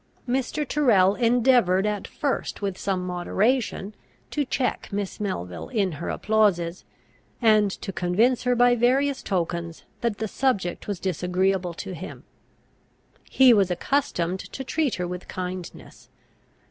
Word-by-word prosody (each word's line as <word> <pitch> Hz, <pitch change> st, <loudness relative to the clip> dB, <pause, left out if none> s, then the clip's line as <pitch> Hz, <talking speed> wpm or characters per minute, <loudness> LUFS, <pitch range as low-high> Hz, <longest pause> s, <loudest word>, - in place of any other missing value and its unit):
Mr. 265 Hz, +4 st, -1 dB
Tyrrel 215 Hz, -11 st, +4 dB
endeavoured 235 Hz, -5 st, +3 dB
at 210 Hz, -2 st, -2 dB
first 285 Hz, -2 st, -2 dB
with 200 Hz, -2 st, -2 dB
some 185 Hz, -1 st, -2 dB
moderation 200 Hz, +4 st, 0 dB, 0.4 s
to 295 Hz, -, 0 dB
check 255 Hz, -2 st, -2 dB
Miss 200 Hz, 0 st, -3 dB
Melville 90 Hz, -, -4 dB
in 205 Hz, -7 st, 0 dB
her 155 Hz, +2 st, -5 dB
applauses, 190 Hz, -6 st, +1 dB, 0.5 s
and 215 Hz, -3 st, +4 dB
to 195 Hz, 0 st, -6 dB
convince 210 Hz, +9 st, +2 dB
her 250 Hz, 0 st, +1 dB
by 245 Hz, 0 st, +5 dB
various 260 Hz, +4 st, +2 dB
tokens 170 Hz, -3 st, -3 dB, 0.2 s
that 235 Hz, -3 st, -1 dB
the 220 Hz, -, -2 dB
subject 205 Hz, -7 st, -1 dB
was 200 Hz, -4 st, -3 dB
disagreeable 180 Hz, 0 st, 0 dB
to 195 Hz, +1 st, -6 dB
him. 185 Hz, +2 st, -8 dB, 1.1 s
He 260 Hz, -2 st, +6 dB
was 200 Hz, -4 st, +3 dB
accustomed 180 Hz, -3 st, -1 dB
to 265 Hz, -, -7 dB
treat 290 Hz, -2 st, 0 dB
her 180 Hz, -1 st, -3 dB
with 180 Hz, 0 st, -6 dB
kindness. 185 Hz, -1 st, -7 dB
200 Hz, 135 wpm, -25 LUFS, 180-245 Hz, 1.1 s, He